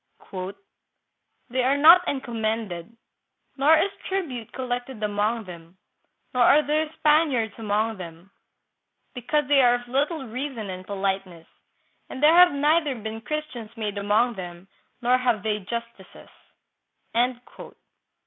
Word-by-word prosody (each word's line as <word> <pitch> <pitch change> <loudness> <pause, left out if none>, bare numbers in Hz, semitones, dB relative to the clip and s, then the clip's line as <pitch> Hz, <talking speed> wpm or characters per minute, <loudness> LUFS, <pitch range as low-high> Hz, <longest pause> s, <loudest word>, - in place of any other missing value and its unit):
" 200 +5 -13
They 255 +1 +1
are 270 +3 +2
not 335 +5 +7
encomended, 225 -6 -3 0.6
nor 290 +4 +5
is 385 +5 +1 0.2
tribute 290 - -4
collected 245 -2 -5
among 210 +2 0
them, 170 -1 -12 0.6
nor 250 - +1
are 290 +5 +6
there 305 +1 0
Spaniards 295 -8 +2
among 215 +1 -1
them, 170 +1 -11 0.8
because 280 +3 -1
they 285 -1 +5
are 245 -1 +5
of 245 0 -7
little 280 +3 -1
reason 235 -4 -5
and 185 0 -9
politeness, 195 -4 -3 0.6
and 265 - -7
there 310 +2 +7
have 355 +1 +7
neither 295 0 +1
been 220 0 -6
Christians 250 -5 -6
made 210 -2 -3
among 215 +4 +2
them 175 -2 -9 0.4
nor 250 +1 +3
have 240 -5 0
they 210 -1 -1
justices." 230 0 -8
235 Hz, 125 wpm, -24 LUFS, 205-280 Hz, 0.8 s, not